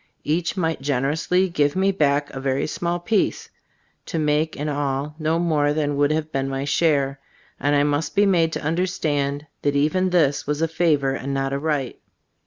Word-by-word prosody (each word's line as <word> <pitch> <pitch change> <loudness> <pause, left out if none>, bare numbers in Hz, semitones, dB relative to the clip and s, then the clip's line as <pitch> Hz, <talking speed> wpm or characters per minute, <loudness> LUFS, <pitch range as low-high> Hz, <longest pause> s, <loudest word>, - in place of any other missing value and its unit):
Each 170 +5 -1
might 165 -5 -1
generously 150 +7 +1
give 145 -4 +1
me 190 +1 +2
back 145 -5 +1
a 135 - -6
very 135 0 0
small 175 +2 -2
piece, 200 +4 0 0.6
to - - -3
make 155 +1 +1
in 145 +2 -4
all 145 0 -2
no 160 +1 +1
more 155 -4 +1
than 145 -1 -1
would 145 0 +2
have 155 0 -1
been 135 0 -1
my 135 0 -3
share, 140 -3 +1 0.4
and 145 +2 +1
I 145 - +4
must 145 +2 -1
be 205 - +5
made 170 -4 +3
to - - -4
understand 150 -4 -1 0.2
that 145 0 0
even 185 +6 +2
this 150 -7 +2
was 150 0 -1
a 165 - +2
favor 155 -4 +1
and 135 +1 -3
not 135 0 -1
a 140 - -1
right. 145 -4 -2
150 Hz, 190 wpm, -22 LUFS, 140-165 Hz, 0.6 s, be